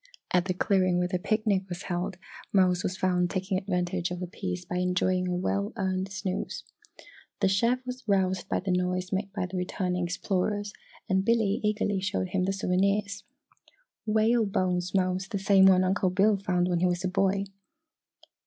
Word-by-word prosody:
At 180 Hz, -1 st, +3 dB
the 185 Hz, -1 st, -1 dB
clearing 185 Hz, -2 st, +2 dB
where 180 Hz, 0 st, +1 dB
the 180 Hz, 0 st, -2 dB
picnic 205 Hz, -2 st, 0 dB
was 175 Hz, -1 st, -6 dB
held, 175 Hz, 0 st, -3 dB, 0.3 s
Mose 180 Hz, -2 st, +3 dB
was 185 Hz, +1 st, -3 dB
found 180 Hz, -1 st, +1 dB
taking 190 Hz, +1 st, -1 dB
advantage 180 Hz, -3 st, -1 dB
of 180 Hz, 0 st, -5 dB
the 180 Hz, -, -3 dB
peace 90 Hz, -, -5 dB
by 180 Hz, -, -3 dB
enjoying 180 Hz, 0 st, +1 dB
a 180 Hz, -, -1 dB
well 200 Hz, +3 st, -1 dB
earned 190 Hz, -2 st, -2 dB
snooze. 190 Hz, -1 st, -4 dB, 0.8 s
The 200 Hz, -, +3 dB
chef 235 Hz, +7 st, +1 dB
was 255 Hz, +1 st, -6 dB
roused 190 Hz, -1 st, +1 dB
by -, -, 0 dB
the 190 Hz, 0 st, -2 dB
noise 180 Hz, +1 st, -1 dB
made 195 Hz, +1 st, -2 dB
by 190 Hz, -2 st, -2 dB
the 185 Hz, +1 st, -5 dB
returning 180 Hz, 0 st, -1 dB
explorers 200 Hz, +3 st, -2 dB, 0.3 s
and 190 Hz, -2 st, +2 dB
Billy 220 Hz, -2 st, +2 dB
eagerly 210 Hz, -2 st, 0 dB
showed 185 Hz, -1 st, -1 dB
him 185 Hz, 0 st, 0 dB
the 195 Hz, -, 0 dB
souvenirs. 200 Hz, +2 st, 0 dB, 0.8 s
"Whale 220 Hz, +1 st, +3 dB
bones, 180 Hz, -1 st, -1 dB
Mose 185 Hz, 0 st, +1 dB
the 200 Hz, -, -3 dB
same 195 Hz, 0 st, +5 dB
one 185 Hz, -1 st, +5 dB
Uncle 185 Hz, 0 st, +1 dB
Bill 200 Hz, +3 st, +3 dB
found 180 Hz, -2 st, 0 dB
when 175 Hz, -1 st, +1 dB
he 180 Hz, -, +3 dB
was 175 Hz, +1 st, -1 dB
a -, -, +1 dB
boy." 195 Hz, +1 st, +1 dB
185 Hz, 180 wpm, -28 LUFS, 180-200 Hz, 0.8 s, same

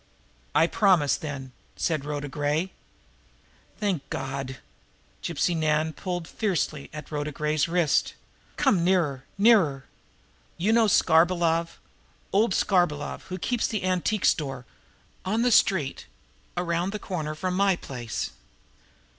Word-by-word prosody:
"I 165 Hz, -, +6 dB
promise, 175 Hz, -6 st, +3 dB
then," 140 Hz, -4 st, -6 dB, 0.2 s
said 155 Hz, -4 st, -1 dB
Rhoda 145 Hz, -1 st, -3 dB
Gray. 150 Hz, +6 st, -1 dB, 1.1 s
"Thank 190 Hz, -9 st, -2 dB
God!" 135 Hz, -1 st, -4 dB, 0.6 s
Gypsy 170 Hz, +1 st, 0 dB
Nan 155 Hz, 0 st, +1 dB
pulled 175 Hz, -2 st, -4 dB
fiercely 165 Hz, -9 st, -2 dB
at 155 Hz, +1 st, -9 dB
Rhoda 150 Hz, 0 st, -2 dB
Gray's 150 Hz, +1 st, 0 dB
wrist. 170 Hz, -3 st, +1 dB, 0.4 s
"Come 180 Hz, -4 st, +3 dB
nearer 165 Hz, -8 st, +1 dB
nearer! 195 Hz, -, +4 dB, 0.7 s
You 200 Hz, +6 st, +2 dB
know 230 Hz, -1 st, +5 dB
Skarbolov, 170 Hz, -2 st, +3 dB, 0.6 s
old 205 Hz, 0 st, +3 dB
Skarbolov, 175 Hz, -7 st, +1 dB
who 185 Hz, -, -4 dB
keeps 240 Hz, +5 st, 0 dB
the 215 Hz, -4 st, -3 dB
antique 185 Hz, +3 st, 0 dB
store 135 Hz, -4 st, 0 dB, 0.6 s
on 220 Hz, +5 st, 0 dB
the 245 Hz, -, +3 dB
street 175 Hz, -10 st, +2 dB, 0.5 s
around 175 Hz, +2 st, -1 dB
the -, -, -2 dB
corner 160 Hz, -7 st, -4 dB
from 185 Hz, +3 st, -2 dB
my 195 Hz, 0 st, +3 dB
place?" 120 Hz, -8 st, -5 dB
165 Hz, 120 wpm, -26 LUFS, 145-185 Hz, 1.1 s, I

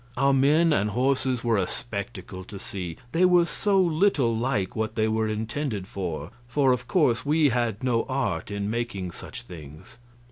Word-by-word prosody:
Our 140 Hz, +1 st, +3 dB
men 150 Hz, +5 st, +4 dB
and 105 Hz, -5 st, +1 dB
horses 130 Hz, +1 st, 0 dB
were 115 Hz, -2 st, +2 dB
a 95 Hz, -2 st, +1 dB
spectacle 100 Hz, -4 st, -6 dB
to 100 Hz, -, -9 dB
see, 90 Hz, -4 st, -6 dB
they 170 Hz, -, +2 dB
were 180 Hz, -1 st, +5 dB
so 200 Hz, +2 st, +1 dB
little 160 Hz, -, +2 dB
like 110 Hz, -5 st, -1 dB
what 110 Hz, 0 st, -2 dB
they 110 Hz, -1 st, +2 dB
were 110 Hz, 0 st, 0 dB
intended 110 Hz, 0 st, -3 dB
for; 90 Hz, -4 st, -5 dB, 0.2 s
for, 135 Hz, +1 st, +3 dB
of 125 Hz, -1 st, -1 dB
course, 140 Hz, -10 st, +2 dB
we 150 Hz, 0 st, +3 dB
had 120 Hz, -3 st, -1 dB
no 120 Hz, -3 st, +1 dB
art 115 Hz, -12 st, -1 dB
in 100 Hz, 0 st, -3 dB
making 110 Hz, -5 st, -3 dB
such 120 Hz, +7 st, -9 dB
things. 80 Hz, -, -12 dB
120 Hz, 175 wpm, -26 LUFS, 100-135 Hz, 0.2 s, were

